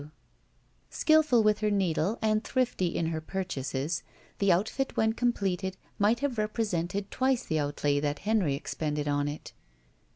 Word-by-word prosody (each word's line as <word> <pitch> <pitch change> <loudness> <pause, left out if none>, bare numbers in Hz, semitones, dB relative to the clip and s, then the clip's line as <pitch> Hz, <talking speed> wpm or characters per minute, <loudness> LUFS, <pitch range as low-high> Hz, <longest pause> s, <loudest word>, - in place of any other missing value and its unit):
W. 150 +1 -12 0.8
Skillful 310 -7 +4
with 210 -1 +3
her 215 0 +1
needle 195 0 +1
and 215 0 +2
thrifty 245 -8 0
in 165 -1 -1
her 160 -1 -3
pur 190 +4 -3
chases, 145 -1 -3 0.4
the 200 -1 +4
outfit 220 +9 0
when 220 0 +3
completed 195 -6 -1 0.2
might 215 +4 +3
have 270 -6 -1
represented 205 -3 -1
twice 260 -1 +1
the 160 - 0
outlay 145 0 0
that 145 0 -1
Henry 205 -10 +2
expended 150 0 -3
on 145 0 +1
it. 145 +1 -6
190 Hz, 155 wpm, -29 LUFS, 155-220 Hz, 0.8 s, Skillful